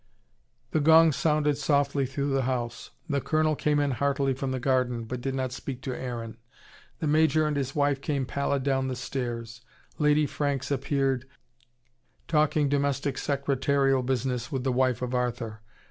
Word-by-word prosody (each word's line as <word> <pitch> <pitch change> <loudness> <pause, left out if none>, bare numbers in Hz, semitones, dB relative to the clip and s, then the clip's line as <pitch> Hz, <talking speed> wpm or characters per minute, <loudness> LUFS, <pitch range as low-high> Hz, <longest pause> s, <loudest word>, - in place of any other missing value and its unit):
The 155 - +2
gong 160 +2 +6
sounded 150 -1 +1
softly 140 -1 +1
through 140 +2 -2
the 135 - +2
house. 120 -2 -3 0.2
The 140 -3 0
Colonel 155 +1 +1
came 150 0 +1
in 145 -1 +1
heartily 140 +1 +1
from 135 +1 -3
the 130 - -2
garden, 125 -2 +1
but 125 +2 -5
did 135 +1 -2
not 130 -1 -2
speak 125 0 -6
to 130 -2 -3
Aaron. 115 -3 -5 0.6
The - - -3
Major 155 +1 +3
and 150 -1 0
his 135 -1 -2
wife 145 -2 +1
came 140 -3 -1
pallid 140 +1 -1
down 135 -1 +1
the 130 - -2
stairs. 120 -3 -5 0.4
Lady 150 0 +4
Franks 140 -1 -2
appeared, 135 -2 0 1.0
talking 150 -2 +2
domestic 140 0 0
secretarial 140 -1 +1
business 125 0 -2
with 135 -3 -2
the 130 -1 0
wife 125 -1 +1
of 125 0 -3
Arthur. 120 -3 -2
135 Hz, 160 wpm, -27 LUFS, 125-145 Hz, 1.0 s, gong